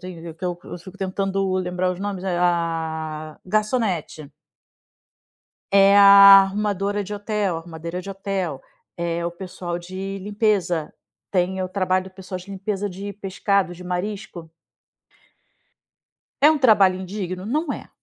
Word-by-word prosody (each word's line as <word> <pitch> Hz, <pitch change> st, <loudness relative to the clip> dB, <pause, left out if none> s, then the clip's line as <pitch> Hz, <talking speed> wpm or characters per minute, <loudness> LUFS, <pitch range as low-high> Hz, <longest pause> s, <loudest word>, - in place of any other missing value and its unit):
que 170 Hz, -1 st, -9 dB
eu 175 Hz, -1 st, -2 dB
eu -, -, -8 dB
fico 185 Hz, +3 st, -13 dB
tentando 195 Hz, 0 st, -1 dB
lembrar 180 Hz, 0 st, -1 dB
os 180 Hz, -, -5 dB
nomes, 200 Hz, -2 st, -4 dB
é, 185 Hz, -2 st, -1 dB
ah, 160 Hz, -3 st, -2 dB
garçonete. 200 Hz, -, -1 dB, 1.4 s
É 200 Hz, 0 st, +6 dB
a 200 Hz, 0 st, +10 dB
arrumadora 200 Hz, 0 st, -1 dB
de 200 Hz, +1 st, -8 dB
hotel, 205 Hz, -3 st, -1 dB
arrumadeira 165 Hz, +1 st, -6 dB
de 185 Hz, -, -10 dB
hotel, 195 Hz, -7 st, -3 dB, 0.4 s
é 170 Hz, 0 st, -2 dB
o -, -, -2 dB
pessoal 175 Hz, -1 st, -6 dB
de 190 Hz, +3 st, -6 dB
limpeza, 200 Hz, -5 st, 0 dB, 0.4 s
tem 190 Hz, 0 st, 0 dB
o 185 Hz, -, -3 dB
trabalho 185 Hz, -1 st, 0 dB
do 190 Hz, -, -11 dB
pessoal 185 Hz, 0 st, -7 dB
de 185 Hz, +2 st, -12 dB
limpeza 200 Hz, +1 st, -3 dB
de 200 Hz, +2 st, -7 dB
pescado, 195 Hz, -1 st, -1 dB
de 180 Hz, -, -11 dB
marisco. 180 Hz, -2 st, -5 dB, 1.9 s
É 295 Hz, -, +8 dB
um 315 Hz, -, +1 dB
trabalho 200 Hz, -8 st, +4 dB
indigno? 185 Hz, -1 st, -5 dB
Não 295 Hz, +5 st, -1 dB
é. -, -, -8 dB
185 Hz, 135 wpm, -22 LUFS, 175-200 Hz, 1.9 s, a